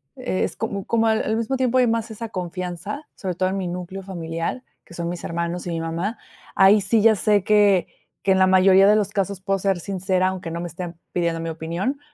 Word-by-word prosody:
es 255 -7 -2
como 200 -3 -4
como 225 -1 +2
al 220 0 +2
al 220 - 0
mismo 230 +4 -1
tiempo 255 -1 +1
hay 250 -1 +4
más 230 0 0
esa 225 +1 -6
confianza, 185 - -5
sobre 185 -4 -4
todo 185 +1 +1
en 195 - -2
mi 185 -2 -2
núcleo 180 +2 -5
familiar, 170 +4 -4 0.2
que - - -15
son 170 0 -3
mis 175 0 -5
hermanos 170 +1 -3
y - - -2
mi 165 - -2
mamá. 170 +7 -3 0.4
Ahí 195 +2 +6
sí, 210 +3 +2
ya 220 0 +6
sé 205 -1 +2
que 205 -3 +4 0.4
que 195 - +2
en 190 - +2
la 190 - +5
mayoría 190 +1 +6
de 210 - +6
los 210 -2 +1
casos 200 -1 -2
puedo 195 0 0
ser 195 -1 0
sincera, 185 0 0
aunque 185 -3 -4
no 170 +1 -4
me 175 - -4
estén 175 +1 -7 0.2
pidiendo 170 -2 -1
mi 165 - -3
opinión 170 - -3
190 Hz, 230 wpm, -23 LUFS, 175-210 Hz, 0.4 s, Ahí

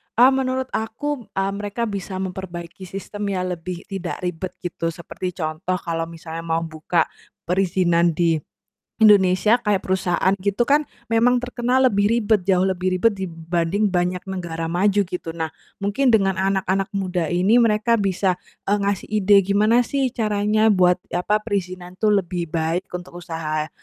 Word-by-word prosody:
Ah 250 +3 +7
menurut 260 -1 -1
aku, 230 +3 -3
eee, 195 0 0
mereka 205 +3 -4
bisa 200 -3 -4
memperbaiki 180 -1 -7
sistem 205 +2 -5
yang 185 -2 -1
lebih 175 +1 -5
tidak 190 -3 -5
ribet 180 +1 -4
gitu, 170 -1 -3
seperti 170 +2 -5
contoh 165 +2 -2
kalau 165 -2 -3
misalnya 165 0 -8
mau 165 0 -1
buka 160 +1 0 0.4
perizinan 175 -2 +2
di 165 -1 +2 0.6
Indonesia 210 +1 +5
kayak 205 -4 +1
perusahaan 185 0 +1
gitu 200 +4 +1
kan, 290 +3 +3 0.3
memang 240 +2 +4
terkenal 250 +1 +1
lebih, 205 -1 +2
ribet 220 -3 +2
jauh 185 0 +4
lebih 185 -1 0
ribet 225 +3 +3
dibanding 175 +2 -1
banyak 180 0 0
negara 170 -4 -4
maju 190 +5 +2
gitu. 180 -2 -5
Nah 160 -1 -3 0.2
mungkin 205 +7 +1
dengan 195 -4 +3
anak-anak 195 0 0
muda 180 -4 -1
ini, 195 +7 +4
mereka 225 0 +2
bisa, 190 -1 +1 0.3
eee, 205 +1 +2
ngasih 200 -1 -1
ide 205 -1 +5
gimana 215 +5 +3
sih 270 +1 0
caranya 215 -1 +2
buat, 180 -1 +4 0.2
apa, 180 +4 +1
perizinan 185 -4 -3
tuh 215 - +4 0.2
lebih 175 -1 -4
baik 165 +3 -1
untuk 175 0 -8
usaha, 155 -3 -3
190 Hz, 150 wpm, -22 LUFS, 175-210 Hz, 0.6 s, Ah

